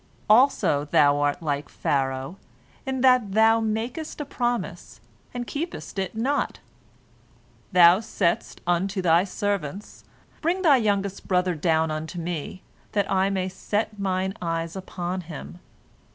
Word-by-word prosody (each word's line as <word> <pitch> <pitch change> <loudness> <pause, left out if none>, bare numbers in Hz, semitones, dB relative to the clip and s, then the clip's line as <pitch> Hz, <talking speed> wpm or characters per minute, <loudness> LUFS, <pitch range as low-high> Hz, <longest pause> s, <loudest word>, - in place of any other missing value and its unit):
Also 215 - +4
thou 145 -1 +4
art 145 +4 0
like 145 -2 -2
Pharaoh 135 +4 -2 0.5
in 265 -1 -2
that 250 -6 +4
thou 225 +1 +5
makest 230 +9 -3
a 295 - -3
promise 240 - -3 0.3
and 245 0 -4
keepest 295 - -5
it 190 +2 -3
not. 265 +6 -1 1.1
Thou 180 0 +7
saidst 215 -6 -1
unto 185 +3 0
thy 170 0 +4
servants, 200 -3 -4 0.4
Bring 360 +4 0
thy 295 -6 +6
youngest 200 -4 -1
brother 180 -1 +2
down 160 0 +1
unto 155 +3 -5
me, 170 +1 -5 0.3
that 205 -2 0
I 190 0 +2
may 190 -2 -1
set 210 +3 -3
mine 190 -1 -1
eyes 165 0 -2
upon 185 -1 -4
him. 135 - -9
190 Hz, 130 wpm, -25 LUFS, 165-220 Hz, 1.1 s, Thou